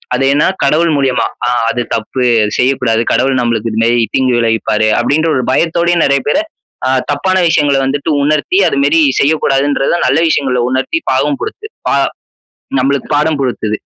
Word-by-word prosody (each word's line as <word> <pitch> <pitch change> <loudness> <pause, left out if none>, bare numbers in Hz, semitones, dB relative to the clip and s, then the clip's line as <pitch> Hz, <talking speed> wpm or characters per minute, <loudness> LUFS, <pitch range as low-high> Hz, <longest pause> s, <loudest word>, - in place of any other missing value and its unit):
அது 130 - -1
ஏன்னா, 145 - +2 0.2
கடவுள் 160 +4 +2
மூலியமா. 135 -2 0 0.2
ஆ, - - +1 0.2
அது 120 - -2
தப்பு, 115 +3 -3 0.2
அது 105 - -2
செய்யக்கூடாது. 125 -3 +1
கடவுள் 130 0 +1
நம்மளுக்கு 115 -2 -1
இந்த 110 +1 -1
மாரி 120 0 +2
தீங்கு 130 -2 +1
விளைவிப்பாரு, 110 -1 0
அப்படின்ற 155 +3 +1
ஒரு 125 - -1
பயத்தோடயும் 170 +3 +1
நறைய 140 0 +1
பேரு, 150 - +2 0.5
அ, - - +1 0.2
தப்பான 185 +7 0
விஷயங்கள 145 -3 +2
வந்துட்டு 140 +3 -2
உணர்த்தி, 155 +5 +1
அது 140 - -2
மாரி 160 +3 +3 0.2
செய்யக்கூடாதுன்றத, 140 -2 +1 0.2
நல்ல - - +2
விஷயங்கள 130 -5 0
உணர்த்தி, 130 - -1
பாடம் 285 -2 0
குடுத்து. 430 0 -6 0.2
பா - - +2 0.8
நம்மளுக்கு 135 +1 -1
பாடம் 150 +1 +1
புகுத்துது. 110 -5 -2
135 Hz, 160 wpm, -13 LUFS, 125-155 Hz, 0.8 s, மாரி